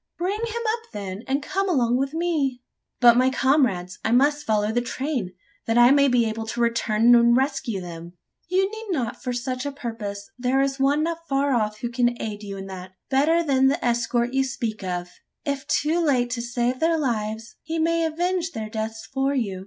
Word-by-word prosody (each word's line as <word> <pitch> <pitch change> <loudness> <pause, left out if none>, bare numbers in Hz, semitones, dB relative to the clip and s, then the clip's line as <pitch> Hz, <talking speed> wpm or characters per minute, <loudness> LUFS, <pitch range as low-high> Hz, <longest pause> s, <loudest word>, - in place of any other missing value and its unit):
"Bring 375 +5 -1
him 465 0 -3
up, 460 0 -7
then, 200 -1 -5
and 275 +2 0
come 390 +5 -1
along 245 -8 +2
with 270 +2 0
me!" 295 -7 -1 0.4
"But 240 -1 +7
my 255 +1 +4
comrades? 255 -10 +1
I - - 0
must 290 +4 +3
follow 210 -1 +1
the 240 +2 +1
train, 245 -7 -3 0.3
that 225 +1 +2
I 240 +1 +7
may 280 0 +5
be 245 -3 +3
able 220 0 -3
to 235 +2 -4
return 230 0 +3
and 235 0 +6
rescue 265 -6 -1
them?" 170 -1 -8 0.3
"You 375 +2 +2
need 440 0 -8
not, 255 - -2
for 250 - -3
such 250 +1 -3
a 285 - -3
purpose. 225 -5 -6
There 255 +2 +1
is 275 0 0
one 285 +3 +2
not 335 0 -4
far 275 0 +1
off 215 -3 -1
who 240 - -2
can 240 -1 +1
aid 210 -1 -5
you 200 -2 -7
in 195 - -6
that 185 -1 -9 0.2
better 315 +6 +3
than 265 -3 +3
the 285 +3 0
escort 240 +1 0
you 270 0 +3
speak 230 -6 -4
of. 180 -1 -4 0.3
If 280 -2 -3
too 325 +4 +1
late 250 -5 +2
to 240 -1 -2
save 240 +1 -1
their 325 0 +2
lives, 225 -5 -3
he 325 +1 -4
may 330 +1 +1
avenge 345 +2 -1
their 215 -1 -5
deaths 220 0 -4
for 270 +3 -1
you. 200 -8 -2
250 Hz, 205 wpm, -24 LUFS, 225-285 Hz, 0.4 s, But